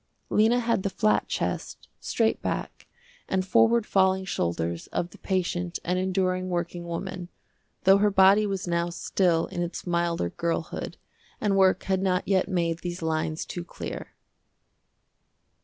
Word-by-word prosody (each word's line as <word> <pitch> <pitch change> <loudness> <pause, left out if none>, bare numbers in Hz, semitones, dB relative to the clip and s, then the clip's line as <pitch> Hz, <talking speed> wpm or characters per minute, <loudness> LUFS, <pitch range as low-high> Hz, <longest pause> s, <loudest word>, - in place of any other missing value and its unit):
Lena 220 +3 +4
had 230 -4 +1
the 195 - -1
flat 215 +2 +1
chest, - - -3
straight 225 -1 0
back - - -4 0.4
and 185 -1 0
forward 230 +4 +4
falling 190 -1 +2
shoulders 85 - -2
of 175 - -3
the - - -15
patient 180 -2 -1
and 180 +1 0
enduring 185 0 0
working 175 0 -3
woman, 175 +1 -5 0.5
though 195 +1 +6
her 210 +1 +4
body 195 +2 +5
was 195 -2 -3
now 170 0 0
still 170 -1 +1
in 175 - -5
its 175 0 -4
milder 170 - 0
girlhood 170 - -3 0.4
and 205 -2 +1
work 190 -1 +4
had 190 -1 0
not 185 -1 0
yet 190 -1 +2
made 170 -3 0
these 175 -1 -5
lines 155 0 -1
too 175 - -5
clear. 175 - -7
185 Hz, 145 wpm, -26 LUFS, 170-195 Hz, 0.5 s, though